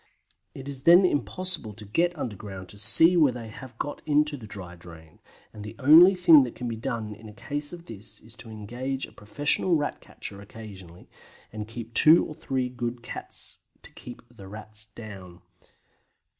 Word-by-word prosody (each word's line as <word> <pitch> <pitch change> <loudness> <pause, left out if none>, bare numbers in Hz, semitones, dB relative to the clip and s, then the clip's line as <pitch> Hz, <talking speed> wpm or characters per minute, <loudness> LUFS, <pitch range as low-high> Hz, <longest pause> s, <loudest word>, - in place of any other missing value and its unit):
It 135 0 -9
is 140 -1 -6
then 175 +3 +8
impossible 170 - -1
to 105 0 -11
get 170 - 0
underground 100 -7 -7
to 105 - -13
see 160 - +6
where 155 -6 +5
they 115 -2 -8
have 125 +2 -11
got 145 - -5
into 150 0 +2
the 115 -6 -10
dry 90 -4 -6
drain, 80 -2 -15 0.3
and 105 - -9
the 105 - -8
only 160 +7 +8
thing 170 -5 +7
that 125 -3 -3
can 125 - -5
be 115 - -3
done 110 -2 -4
in 110 +1 -12
a - - -12
case 145 +7 -5
of 175 -1 -10
this 110 -1 -10
sort - - -11
is 115 +1 -8
to 115 - -12
engage 120 +5 -5
a - - -17
professional 145 - +1
Rat 145 -2 -2
catcher 100 - -10
occasionally, 100 -5 -12 0.5
and 105 -1 -6
keep 115 0 -9
two 155 +7 +6
or - - -7
three 130 -3 -2
good 120 -1 -5
cats - - -4 0.2
to - - -9
keep - - -11
the 95 - -12
Rats 105 +1 -10
down. 95 -5 -11
115 Hz, 185 wpm, -26 LUFS, 105-145 Hz, 0.5 s, then